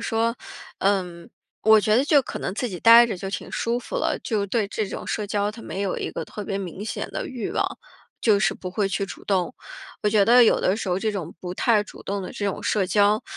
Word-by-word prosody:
说， 230 +1 +1 0.4
呃， 195 -1 +2 0.6
我 220 0 +7
觉 215 0 +2
得 245 - +4
就 290 -1 +4
可 - - -6
能 - - -3
自 245 +3 -2
己 180 -5 -7
呆 230 +1 +8
着 225 - -4
就 195 +2 -5
挺 185 - -5
舒 235 +1 -1
服 375 - -6
了。 - - 0
就 210 -4 -1
对 215 +1 0
这 210 +1 -3
种 - - -6
社 210 - -2
交， 205 0 0
它 230 - -11
没 200 - -5
有 195 - -2
一 - - -3
个 - - -5
特 210 - -7
别 195 - -3
明 190 0 -6
显 220 - -4
的 - - -4
欲 250 -4 -4
望， - - +1 0.6
就 210 -3 +4
是 - - +2
不 185 - -7
会 200 +1 0
去 195 +1 -1
主 195 - -10
动。 185 -4 0 0.5
我 210 - +3
觉 205 -1 +4
得 245 +4 +7
有 230 - +4
的 185 - +2
时 215 - -4
候 180 0 +1
这 215 +1 -1
种 190 -6 -5
不 180 -1 -5
太 220 +1 +3
主 210 - -13
动 200 0 -3
的 - - -7
这 205 - -3
种 200 - -3
社 200 -3 +1
交， 205 +3 +3
205 Hz, 270 characters per minute, -24 LUFS, 195-225 Hz, 0.6 s, 呆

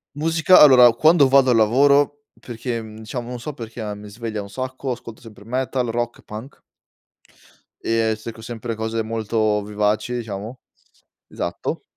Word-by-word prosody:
Musica 165 +4 +4
allora 125 -4 +8
quando 155 +3 +5
vado 135 0 +4
al - - +3
lavoro, 140 +6 +3 0.2
perché 120 -1 -5
mhmm, 110 -1 -11
diciamo 120 +2 -6
non 125 -1 -6
so 150 +5 -6
perché 115 -3 -8
ma 105 -1 -4
mi 105 0 -10
sveglia 110 0 -5
un 100 - -10
sacco, 130 +4 -5
ascolto 115 -2 -8
sempre 110 -3 -14
metal, 125 0 -2
rock, 120 +1 -3
punk 110 +6 -10 1.2
e 115 -1 +1
cerco 115 +1 -9
sempre 115 0 -5
cose 110 0 -2
molto 110 -1 -1
vivaci, 105 +3 -1
diciamo, 110 +1 -6 0.7
esatto. - - -4
115 Hz, 150 wpm, -21 LUFS, 110-130 Hz, 1.2 s, allora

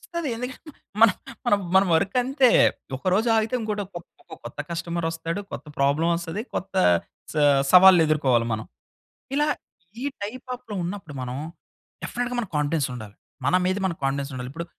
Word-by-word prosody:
వస్తది 335 -5 -1
ఎందుకంటే, 250 +6 -7 0.3
మన, 230 - +9 0.7
మన 190 - +8
వర్క్ 190 +7 0
అంతే. 265 +1 +3 0.5
ఒకరోజు 185 - +1
ఆగితే 220 +2 0
ఇంకోటి 210 -2 -2
ఇంకో 175 -3 -12
కొత్త - - -8
కస్టమర్ 170 0 -3
వస్తాడు. 165 +3 -4
కొత్త - - -7
ప్రాబ్లమ్ 145 +5 +2
వస్తది. 170 +4 -4
కొత్త 195 +2 -4 0.6
స - - -13 0.4
సవాళ్ళెదుర్కోవాలి 155 -10 +6
మనం. 110 0 -4 0.7
ఇలా 295 +1 +2 0.6
ఈ - - -2 0.2
టైప్ 235 +5 -6
ఆఫ్‌లో 230 -4 -9
ఉన్నప్పుడు 175 -3 -6
మనం 125 0 -4 0.7
డెఫినెట్‌గా 245 0 -3
మన 230 - -3
కాన్ఫిడెన్స్ 150 0 +1
ఉండాలి. 110 -4 -9 0.3
మన 180 - +4
మీద 185 +1 +1
మనకి 170 -3 -2
కాన్ఫిడెన్స్ 140 +1 -1
ఉండాలి. 125 0 -5
ఇప్పుడు 170 +4 -6
175 Hz, 145 wpm, -24 LUFS, 150-215 Hz, 0.7 s, మన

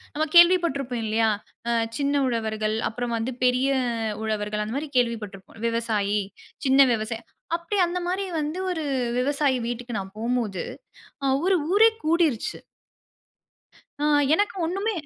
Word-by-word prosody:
நம்ம 305 - +1
கேள்வி 345 +1 +9
பட்ருப்போம் 265 -7 -2
இல்லயா! 220 +1 +2 0.4
அ - - +2 0.3
சின்ன 280 0 +1
உழவர்கள், 220 -2 -1
அப்புறம் 240 +1 -3
வந்து 225 +3 -2
பெரிய 250 +2 +3 0.5
உழவர்கள், 210 -1 -2
அந்தமாரி 265 +8 -3
கேள்வி 235 -2 +2
பட்ருப்போம். 195 +2 -11
விவசாயி, 220 -3 0 0.5
சின்ன 265 +1 +4
விவசாய 225 +1 -3 0.3
அப்பிடியே 345 +4 -1
அந்தமாரி 360 +2 -2 0.2
வந்து, 305 +4 -3
ஒரு 325 -3 -3 0.4
விவசாயி 280 0 +1
வீட்டுக்கு 240 -1 -4
நான் 190 0 -8
போம்போது, 225 -5 -1 0.6
அ - - +2 0.2
ஒரு 380 0 +4 0.2
ஊரே 445 +3 +7 0.2
கூடிருச்சு. 315 -7 +1 1.4
ஆ, - - 0 0.3
எனக்கு 410 +4 +1
ஒண்ணுமே 390 +7 -1
250 Hz, 130 wpm, -25 LUFS, 220-320 Hz, 1.4 s, கேள்வி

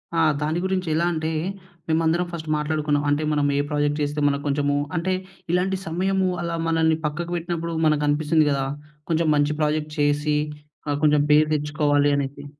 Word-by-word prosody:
ఆ! - - +2 0.2
దాని 155 +3 0
గురించి 185 -2 -1
ఎలా 170 +2 +1
అంటే, 160 0 -2 0.6
మేమందరం 165 +2 +1
ఫస్ట్ 160 -2 -6
మాట్లాడుకున్నాం. 150 -1 0
అంటే 145 +2 +1
మనం 145 -1 +1
ఏ - - +2
ప్రాజెక్ట్ 145 0 0
చేస్తే 145 +1 -1
మనకు 140 0 0
కొంచెము 145 0 +1 0.2
అంటే 185 +2 0 0.4
ఇలాంటి 185 +2 +1
సమయము 190 +3 0
అలా 170 -1 -2
మనల్ని 160 -1 +2
పక్కకు 170 +3 -3
పెట్టినప్పుడు 170 0 -3
మనకనిపిస్తుంది 150 +1 +2
కదా! 135 -1 0 0.5
కొంచెం 165 0 +2
మంచి 145 +1 +2
ప్రాజెక్ట్ 150 0 0
చేసి 145 +1 +2 0.5
ఆహ్, 145 0 0
కొంచెము 150 -1 +4
పేరు 150 +1 +5
తెచ్చుకోవాలనేసి. 145 -1 0
150 Hz, 150 wpm, -23 LUFS, 145-165 Hz, 0.6 s, పేరు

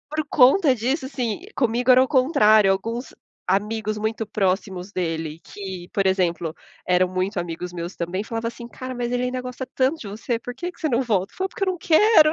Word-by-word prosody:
Por 310 -2 -1
conta 270 +2 +5
disso, 260 +5 -1
assim, 250 -2 -3
comigo 245 0 +1
era 255 0 +8
o - - -2
contrário, 220 - +5
alguns 230 +6 -3 0.3
amigos 215 +2 0
muito 220 +1 -2
próximos 190 -1 -1
dele, 165 -4 -3
que 190 -3 -8
por 195 - 0
exemplo, 175 -4 +1 0.3
eram 180 0 +4
muito 185 +2 -1
amigos 175 +1 -5
meus 170 +1 -5
também, 175 +3 -3
falava 230 +1 -3
assim: 235 0 -7
"Cara, 255 +2 -7
mas 240 -1 -3
ele 245 0 0
ainda 250 0 -2
gosta 250 +1 -6
tanto 265 +5 +2
de 225 - -8
você, 220 +4 -3
por 245 +2 -7
que 350 +8 -5
que - - -24
você 320 - 0
não 250 -3 +1
volta, 200 -6 0
falo 380 +1 -2
porque 390 - -4
eu 380 - +2
não 360 - -7
quero". 320 -1 +6
225 Hz, 205 wpm, -23 LUFS, 190-255 Hz, 0.3 s, era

